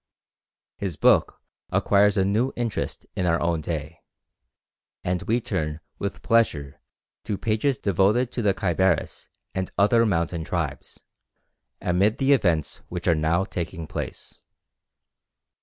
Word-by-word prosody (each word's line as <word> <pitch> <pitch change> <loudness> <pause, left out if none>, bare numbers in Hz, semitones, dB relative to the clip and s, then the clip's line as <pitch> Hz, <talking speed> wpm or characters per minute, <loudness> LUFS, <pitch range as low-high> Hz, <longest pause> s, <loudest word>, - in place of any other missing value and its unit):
His 95 -5 -3
book 75 - +3 0.3
acquires 100 0 +3
a 95 - +3
new 110 +7 +1
interest 120 -3 -3
in 90 - 0
our 85 -1 +2
own 85 -2 0
day, 75 0 -5 1.0
and 90 -1 -1
we 115 +2 +1
turn 75 -8 -3 0.2
with 100 - -4
pleasure 80 - +1 0.4
to 100 - -2
pages 115 +6 0
devoted 105 +6 +2
to 120 - -3
the 100 -3 +2
Khyberis 95 -2 0 0.2
and 95 -1 -2
other 110 +5 +5
mountain 85 -3 0
tribes, 80 -4 -4 0.8
amid 95 +5 +2
the 135 +1 +4
events 85 - +1
which 90 0 -5
are 85 - +6
now 80 +3 +1
taking 85 -3 -5
place. - - -7
95 Hz, 125 wpm, -25 LUFS, 85-105 Hz, 1.0 s, are